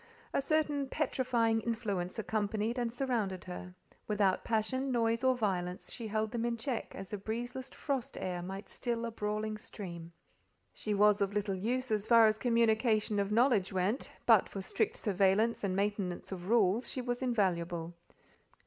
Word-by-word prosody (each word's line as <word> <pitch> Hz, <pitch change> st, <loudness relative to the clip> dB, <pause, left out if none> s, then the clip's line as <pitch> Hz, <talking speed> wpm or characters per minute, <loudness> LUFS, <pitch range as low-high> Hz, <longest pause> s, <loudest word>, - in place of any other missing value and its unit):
A -, -, +2 dB
certain 290 Hz, -1 st, +1 dB
petrifying 240 Hz, -6 st, +1 dB
influence 205 Hz, -7 st, -2 dB
accompanied 215 Hz, +2 st, -1 dB
and 235 Hz, -1 st, -1 dB
surrounded 230 Hz, -7 st, -1 dB
her: 180 Hz, 0 st, -8 dB, 0.3 s
without 200 Hz, -3 st, +2 dB
passion, 260 Hz, +4 st, 0 dB
noise, 230 Hz, 0 st, +1 dB
or 260 Hz, -1 st, +4 dB
violence, 180 Hz, -5 st, -2 dB
she 230 Hz, -2 st, -5 dB
held 215 Hz, 0 st, -1 dB
them 235 Hz, -1 st, -2 dB
in 235 Hz, 0 st, 0 dB
check 240 Hz, +1 st, -3 dB
as 195 Hz, +1 st, -8 dB
a 205 Hz, -, -2 dB
breezeless 245 Hz, +5 st, -4 dB
frost 275 Hz, -5 st, -3 dB
air 180 Hz, -1 st, -3 dB
might 195 Hz, +3 st, -6 dB
still 235 Hz, -1 st, -2 dB
a 230 Hz, -, -3 dB
brawling 215 Hz, 0 st, -2 dB
stream. 170 Hz, -6 st, -7 dB, 0.6 s
She 210 Hz, -1 st, -2 dB
was 205 Hz, 0 st, +5 dB
of 200 Hz, 0 st, +1 dB
little 205 Hz, -1 st, 0 dB
use 245 Hz, +6 st, -1 dB
as 215 Hz, 0 st, +1 dB
far 230 Hz, -1 st, +7 dB
as 215 Hz, 0 st, +2 dB
communication 220 Hz, -3 st, +2 dB
of 200 Hz, 0 st, 0 dB
knowledge 230 Hz, -4 st, +3 dB
went, 190 Hz, +7 st, -1 dB
but 225 Hz, -5 st, +5 dB
for 195 Hz, -, -6 dB
strict -, -, 0 dB
surveillance 200 Hz, +3 st, +2 dB
and 190 Hz, -2 st, 0 dB
maintenance 200 Hz, -3 st, -2 dB
of 185 Hz, 0 st, -6 dB
rules 225 Hz, 0 st, +3 dB
she 255 Hz, -, -3 dB
was 245 Hz, 0 st, -2 dB
invaluable. 175 Hz, -8 st, 0 dB
215 Hz, 165 wpm, -32 LUFS, 195-235 Hz, 0.6 s, far